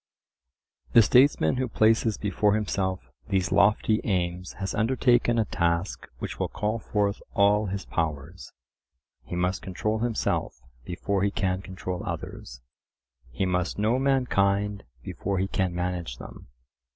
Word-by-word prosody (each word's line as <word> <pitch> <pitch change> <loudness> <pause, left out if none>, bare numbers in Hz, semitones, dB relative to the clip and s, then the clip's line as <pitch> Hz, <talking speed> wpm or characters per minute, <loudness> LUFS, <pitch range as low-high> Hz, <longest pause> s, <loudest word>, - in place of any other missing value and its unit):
The 115 - +8
statesman 125 - +4
who 130 0 0
places 110 -1 +2
before 105 0 +1
himself 95 - -2 0.2
these 95 -2 0
lofty 105 +2 +3
aims 90 -3 -2
has 95 -1 -4
undertaken 120 0 +2
a 110 - +2
task 85 0 -1
which - - -6
will - - 0
call 105 +2 -2
forth 105 -1 -1
all 100 +1 +4
his 95 +1 -4
powers. 80 +1 -4 0.7
He - - -6
must 90 +2 0
control 105 +4 -2
himself 115 -1 -1 0.3
before 95 +2 -2
he 100 - +2
can 95 -2 -1
control 95 -1 -5
others; 65 +1 -7 0.7
he 65 +10 -2
must 90 -1 -1
know 110 +5 +2
mankind 105 -7 +1 0.2
before 100 +8 -3
he 95 +1 0
can 95 -2 -1
manage 90 -7 -3
them. - - -11
100 Hz, 135 wpm, -26 LUFS, 90-110 Hz, 0.7 s, The